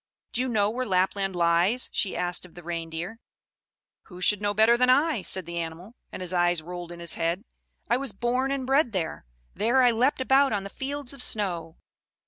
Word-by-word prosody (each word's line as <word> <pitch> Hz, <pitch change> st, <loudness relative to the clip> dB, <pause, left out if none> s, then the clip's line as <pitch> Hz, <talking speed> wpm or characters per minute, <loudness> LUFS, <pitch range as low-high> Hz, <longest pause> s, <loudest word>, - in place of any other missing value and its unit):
Do 250 Hz, -, +1 dB
you 260 Hz, -, 0 dB
know 210 Hz, -4 st, +2 dB
where 255 Hz, +3 st, -2 dB
Lapland 190 Hz, 0 st, +1 dB
lies!" 175 Hz, +8 st, +2 dB
she 195 Hz, -, -1 dB
asked 180 Hz, 0 st, 0 dB
of 180 Hz, -, -14 dB
the 175 Hz, -, -11 dB
Reindeer. 170 Hz, +5 st, -5 dB, 0.9 s
"Who 180 Hz, -2 st, -12 dB
should 205 Hz, +3 st, +2 dB
know 205 Hz, 0 st, 0 dB
better 220 Hz, +3 st, +6 dB
than 250 Hz, +1 st, +3 dB
I?" 285 Hz, -2 st, +3 dB
said 185 Hz, -1 st, -2 dB
the 170 Hz, 0 st, -4 dB
animal; 170 Hz, +6 st, -6 dB, 0.2 s
and -, -, -6 dB
his 180 Hz, 0 st, -5 dB
eyes 175 Hz, -2 st, +2 dB
rolled 175 Hz, 0 st, -7 dB
in 170 Hz, -, -9 dB
his 170 Hz, 0 st, -2 dB
head. 170 Hz, +4 st, -1 dB, 0.4 s
"I 240 Hz, -, +2 dB
was 270 Hz, -2 st, -3 dB
born 245 Hz, +6 st, 0 dB
and 275 Hz, -2 st, -2 dB
bred 270 Hz, -2 st, +2 dB
there 165 Hz, -, -3 dB, 0.3 s
there 235 Hz, +6 st, +3 dB
I 245 Hz, -, +6 dB
leapt 250 Hz, +6 st, +2 dB
about 265 Hz, 0 st, +4 dB
on 200 Hz, -2 st, -1 dB
the 200 Hz, -, -8 dB
fields 280 Hz, 0 st, -3 dB
of 275 Hz, -, -10 dB
snow." 175 Hz, -8 st, -2 dB
200 Hz, 205 wpm, -26 LUFS, 175-250 Hz, 0.9 s, better